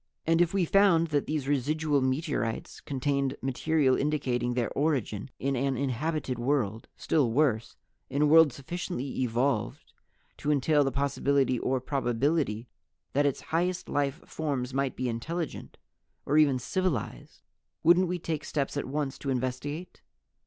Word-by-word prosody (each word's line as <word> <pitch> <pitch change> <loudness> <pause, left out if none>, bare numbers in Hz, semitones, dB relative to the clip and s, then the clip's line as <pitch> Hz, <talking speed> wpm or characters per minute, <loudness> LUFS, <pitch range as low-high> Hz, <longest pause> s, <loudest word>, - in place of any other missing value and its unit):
"And 165 +1 +3
if 175 -1 +3
We 195 -3 +1
found 170 -3 +4
that 145 -2 0
these 150 -3 -2
residual 145 +1 +1
meteorites 130 - -2
contained 140 0 -1
material 135 +1 +1
indicating 125 -5 0
their 120 -3 0
origin 135 -7 -1
in 135 +1 -1
an 135 +1 0
inhabited 135 0 -2
world 120 -4 0
still 140 -7 +1
worse, 120 -4 +1 0.3
in 145 +2 +1
a - - +5
world 160 0 +7
sufficiently 140 0 -4
evolved 125 +2 -1 0.4
to 145 - -3
entail 145 +1 +3
the 135 - 0
possibility 140 -1 +1
or 130 0 0
probability 130 -2 0 0.5
that 145 +1 +3
its 140 - -2
highest 180 +2 0
life 145 +2 0
forms 135 -5 -3
might 135 -1 0
be 130 - -2
intelligent 155 +8 -4 0.5
or 145 - 0
even 140 -4 +4
civilized 155 - -3 0.4
wouldn't 175 +3 +5
we 180 +1 -1
take 160 -3 -3
steps 140 -2 -2
at 145 - -2
once 140 0 -3
to 140 - -4
investigate? 130 +6 -3
140 Hz, 145 wpm, -28 LUFS, 130-155 Hz, 0.5 s, world